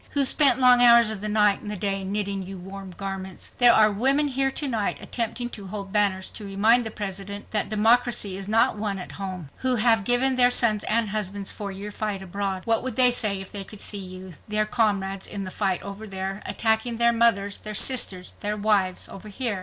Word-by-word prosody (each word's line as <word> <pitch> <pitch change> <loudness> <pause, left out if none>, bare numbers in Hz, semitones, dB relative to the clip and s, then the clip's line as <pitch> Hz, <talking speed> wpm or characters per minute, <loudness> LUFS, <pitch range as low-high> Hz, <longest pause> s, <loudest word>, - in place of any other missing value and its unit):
Who 280 -1 +2
spent 270 0 +4
long 250 -1 +6
hours 235 -2 +6
of 210 -3 -5
the 210 - -3
night 210 -1 +2
and 210 - -8
the 210 - -3
day 195 0 -1
knitting 200 0 -2
you 190 +1 -8
warm 190 +1 -10
garments? 190 0 -7
There 245 -1 +7
are 215 -2 +4
women 270 +8 +1
here 270 0 0
to 285 +2 -4
night 225 -6 -2
attempting 240 +1 -3
to 200 -3 -8
hold 195 0 -7
banners 200 -3 +1
to 215 - -8
remind 220 +4 +2
the - - -5
President 200 -1 -7
that 210 - -1
democracy 220 -2 +2
is 195 0 -5
not 220 +1 +2
won 205 -2 -3
at 180 - -8
home; 185 -6 -7
who 255 -1 +1
have 225 -2 +3
given 255 +3 +4
their 245 -1 +6
sons 220 -4 +3
and 225 -1 +1
husbands 200 -1 -3
for 205 -2 -6
your 200 +2 -8
fight 205 -2 -4
abroad. 190 0 -4
What 225 -1 +1
would 255 -3 -5
they 250 -1 +7
say 210 -5 +1
if 195 - -11
they 200 -1 -4
could 210 +1 -12
see 205 - -1
you, 185 -1 -9
their 215 0 0
comrades 200 -3 -1
in 200 - -6
the 185 - -7
fight 190 -3 -2
over 200 +2 -8
there, 195 +1 -5
attacking 225 +1 0
their 235 0 +3
mothers, 205 -4 +1
their 215 0 -7
sisters, 195 -7 +1
their 210 0 -3
wives 200 -3 0
over 210 +2 -11
here? 210 -1 -2
210 Hz, 215 wpm, -24 LUFS, 195-230 Hz, -, There